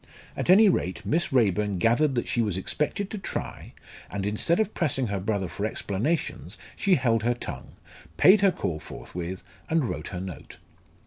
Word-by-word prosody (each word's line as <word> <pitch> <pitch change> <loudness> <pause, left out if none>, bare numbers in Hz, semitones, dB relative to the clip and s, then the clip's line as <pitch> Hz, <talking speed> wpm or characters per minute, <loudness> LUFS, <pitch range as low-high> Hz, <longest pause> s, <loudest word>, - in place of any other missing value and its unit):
At - - -3
any 205 +4 +8
rate 95 - 0
Miss 170 +3 +1
Raeburn 105 -5 +2
gathered 125 - +2
that 120 - -1
she 120 - +1
was 105 -5 -1
expected 150 - -2
to 215 - -4
try, - - -6 0.4
and 100 -1 -3
instead 105 - +1
of 220 -1 0
pressing 135 -6 0
her 100 -1 -1
brother 100 -1 -1
for 100 - -6
explanations 110 - -2 0.2
she 195 -3 +3
held 120 -6 +2
her 120 +2 +1
tongue, - - -8 0.4
paid 195 +2 +7
her 195 -1 +5
call 80 - -3
forthwith, 90 +3 -7 0.3
and 160 -1 +2
wrote 75 -3 -4
her 90 - -5
note. 95 -1 -8
115 Hz, 175 wpm, -26 LUFS, -, 0.4 s, any